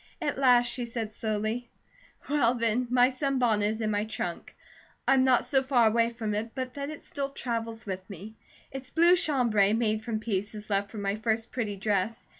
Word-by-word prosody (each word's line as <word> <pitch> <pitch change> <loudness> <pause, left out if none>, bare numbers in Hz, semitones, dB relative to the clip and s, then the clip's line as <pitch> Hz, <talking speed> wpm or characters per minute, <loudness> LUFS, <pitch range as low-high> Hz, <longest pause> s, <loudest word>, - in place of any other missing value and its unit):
At 295 -5 -2
last 250 -3 +5
she 245 0 -1
said 230 -2 -4
slowly: 220 +3 -3 0.6
"Well, 255 -5 +2
then, 235 +1 0
my 250 +1 +4
sunbonnet 250 -6 +1
is 220 +1 -3
in 215 -1 0
my 205 0 0
trunk. 180 -5 -5 0.5
I'm 265 -1 +5
not 260 -2 +3
so 270 -2 +2
far 260 -3 +3
away 230 +1 +3
from 225 -3 -4
it 225 +2 -4
but 255 -1 -4
that 280 0 -5
it 310 - -8
still 275 -1 -4
travels 230 -3 -4
with 190 -1 -6
me. 205 +3 -9 0.4
It's 270 0 -7
blue 340 +4 +5
chambray, 245 - +2
made 220 -1 0
from 225 -2 -2
pieces 210 0 -4
left 200 0 0
from 210 -3 -6
my 200 +1 -1
first 225 +1 -1
pretty 220 -5 -2
dress. 205 +2 -1
230 Hz, 190 wpm, -28 LUFS, 215-255 Hz, 0.6 s, last